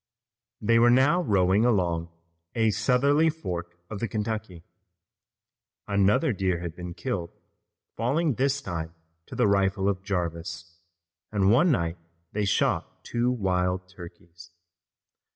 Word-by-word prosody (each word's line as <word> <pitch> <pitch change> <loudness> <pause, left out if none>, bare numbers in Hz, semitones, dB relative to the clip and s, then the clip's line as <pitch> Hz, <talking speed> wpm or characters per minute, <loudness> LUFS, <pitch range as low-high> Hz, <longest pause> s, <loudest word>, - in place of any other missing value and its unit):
They 115 +2 +3
were 120 +1 +6
now 135 +8 +4
rowing 100 - +3
along 85 -8 +1 0.5
a 110 -2 +3
southerly 135 - +3
fork 90 - -5
of 105 0 -6
the 115 - -1
Kentucky. 110 -6 -4 1.2
Another 105 +8 +2
deer 95 -3 0
had 85 -2 -6
been 90 -1 -7
killed, 95 -10 -3 0.6
falling 140 +7 +1
this 140 +3 0
time 85 -2 -5 0.3
to - - -9
the 120 -3 +3
rifle 100 0 +2
of 95 -2 0
Jarvis, 85 -3 -4 0.5
and 100 -2 +3
one 150 +10 +5
night 85 - 0 0.3
they 105 0 -1
shot 100 - 0
two 120 +1 0
wild 90 -5 0
turkeys. 85 -2 -13
100 Hz, 125 wpm, -26 LUFS, 90-120 Hz, 1.2 s, were